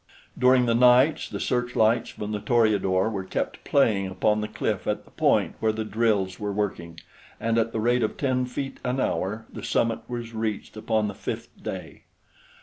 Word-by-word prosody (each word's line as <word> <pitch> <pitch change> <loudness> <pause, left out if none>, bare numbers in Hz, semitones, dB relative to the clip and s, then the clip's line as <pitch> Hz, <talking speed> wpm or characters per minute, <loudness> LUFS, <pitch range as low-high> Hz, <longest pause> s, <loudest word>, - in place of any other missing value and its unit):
During 125 0 +4
the 115 - +2
nights 125 +5 +4
the - - -5
searchlights 120 -2 +1
from 105 0 -6
the 105 - -2
Toreador 105 -4 +2
were 95 -3 -3
kept 95 - -4
playing 105 -8 +2
upon 105 +3 +1
the 105 - -2
cliff - - -2
at - - -1
the - - -20
point - - +2
where 110 - +2
the 110 0 -4
drills 105 -4 0
were 105 -1 -2
working, 90 -5 -3 0.4
and 115 0 0
at 115 0 0
the 115 - -2
rate 120 +2 +2
of 110 - -1
ten 130 -2 0
feet 135 +2 -5
an 125 +1 -1
hour 105 -1 -1
the - - -7
summit 115 -1 0
was 120 -1 -5
reached 110 -2 -3
upon 110 0 0
the 100 - -4
fifth - - -5
day. - - -7
110 Hz, 185 wpm, -25 LUFS, 105-125 Hz, 0.4 s, During